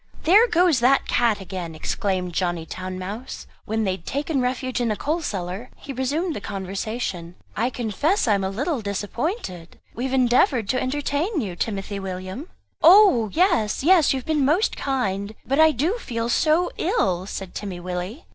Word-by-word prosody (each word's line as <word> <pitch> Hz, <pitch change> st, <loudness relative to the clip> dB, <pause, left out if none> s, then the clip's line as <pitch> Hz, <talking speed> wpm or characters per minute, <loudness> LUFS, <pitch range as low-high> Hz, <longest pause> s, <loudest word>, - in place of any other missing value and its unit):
"There 410 Hz, +9 st, +6 dB
goes 345 Hz, -, +3 dB
that 260 Hz, +3 st, +3 dB
cat 230 Hz, -4 st, +2 dB
again!" 180 Hz, -4 st, -6 dB
exclaimed 180 Hz, +2 st, -2 dB
Johnny 175 Hz, -2 st, -1 dB
Town 185 Hz, +2 st, -6 dB
mouse. 205 Hz, +7 st, -6 dB, 0.2 s
When 220 Hz, +1 st, -1 dB
they 195 Hz, -, +1 dB
had 185 Hz, -2 st, -6 dB
taken 285 Hz, 0 st, -1 dB
refuge 255 Hz, 0 st, -1 dB
in 240 Hz, -, +1 dB
the 215 Hz, -, 0 dB
coal 310 Hz, +9 st, -1 dB
cellar 195 Hz, -, -4 dB
he 275 Hz, -, -8 dB
resumed 295 Hz, +7 st, -1 dB
the -, -, -5 dB
conversation; 195 Hz, -2 st, -4 dB, 0.2 s
"I 235 Hz, +4 st, +1 dB
confess 255 Hz, -, 0 dB
I 215 Hz, -, +4 dB
am 200 Hz, -1 st, 0 dB
a 190 Hz, -, 0 dB
little 270 Hz, -, -2 dB
disappointed; 205 Hz, -, -4 dB
we 245 Hz, -, -3 dB
have 265 Hz, -, -3 dB
endeavoured 245 Hz, -3 st, +3 dB
to 255 Hz, -, +1 dB
entertain 290 Hz, -, -1 dB
you, 195 Hz, -9 st, -3 dB
Timothy 200 Hz, 0 st, -3 dB
William." 190 Hz, -, -6 dB, 0.3 s
"Oh 335 Hz, -, +7 dB
yes, 315 Hz, -, +2 dB
yes, 340 Hz, -2 st, +5 dB
you 270 Hz, -, +1 dB
have 255 Hz, -, -7 dB
been 305 Hz, -3 st, +1 dB
most 320 Hz, -, +2 dB
kind; 210 Hz, -6 st, -2 dB
but 275 Hz, +3 st, 0 dB
I 315 Hz, 0 st, +8 dB
do 315 Hz, -, 0 dB
feel 230 Hz, -, -3 dB
so 315 Hz, +7 st, +2 dB
ill," 260 Hz, -, 0 dB
said 195 Hz, -3 st, -6 dB
Timmy 190 Hz, -4 st, -5 dB
Willie. 180 Hz, -, -5 dB
235 Hz, 175 wpm, -23 LUFS, 195-295 Hz, 0.3 s, I